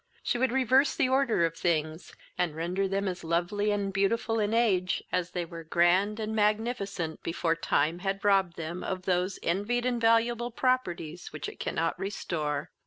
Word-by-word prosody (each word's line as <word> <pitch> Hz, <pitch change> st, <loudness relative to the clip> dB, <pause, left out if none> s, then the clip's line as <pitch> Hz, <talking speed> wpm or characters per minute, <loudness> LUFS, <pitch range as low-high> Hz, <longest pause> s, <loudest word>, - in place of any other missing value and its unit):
She 240 Hz, -, 0 dB
would 260 Hz, -1 st, +2 dB
reverse 265 Hz, +2 st, +3 dB
the 280 Hz, -6 st, +2 dB
order 260 Hz, -9 st, +3 dB
of 165 Hz, 0 st, -2 dB
things, 160 Hz, -1 st, -2 dB, 0.2 s
and 175 Hz, -4 st, -1 dB
render 180 Hz, +4 st, -1 dB
them 195 Hz, +1 st, -1 dB
as 180 Hz, -2 st, -4 dB
lovely 175 Hz, +6 st, 0 dB
and 200 Hz, -1 st, -1 dB
beautiful 225 Hz, +3 st, +1 dB
in 210 Hz, 0 st, +1 dB
age, 200 Hz, -6 st, +2 dB
as 180 Hz, -1 st, 0 dB
they 175 Hz, -1 st, -3 dB
were 165 Hz, 0 st, -9 dB
grand 180 Hz, +6 st, +2 dB
and 220 Hz, 0 st, -3 dB
magnificent 210 Hz, -6 st, -1 dB
before 165 Hz, 0 st, 0 dB
time 165 Hz, 0 st, 0 dB
had 195 Hz, +2 st, -3 dB
robbed 195 Hz, -4 st, +3 dB
them 170 Hz, +2 st, -5 dB
of 185 Hz, -1 st, -3 dB
those 180 Hz, +1 st, 0 dB
envied 205 Hz, +8 st, 0 dB
and 245 Hz, -2 st, 0 dB
valuable 230 Hz, +1 st, +3 dB
properties 180 Hz, -10 st, -1 dB
which 155 Hz, -, -5 dB
it -, -, -9 dB
cannot 165 Hz, +1 st, -1 dB
restore. 155 Hz, -7 st, -3 dB
195 Hz, 175 wpm, -29 LUFS, 170-225 Hz, 0.2 s, reverse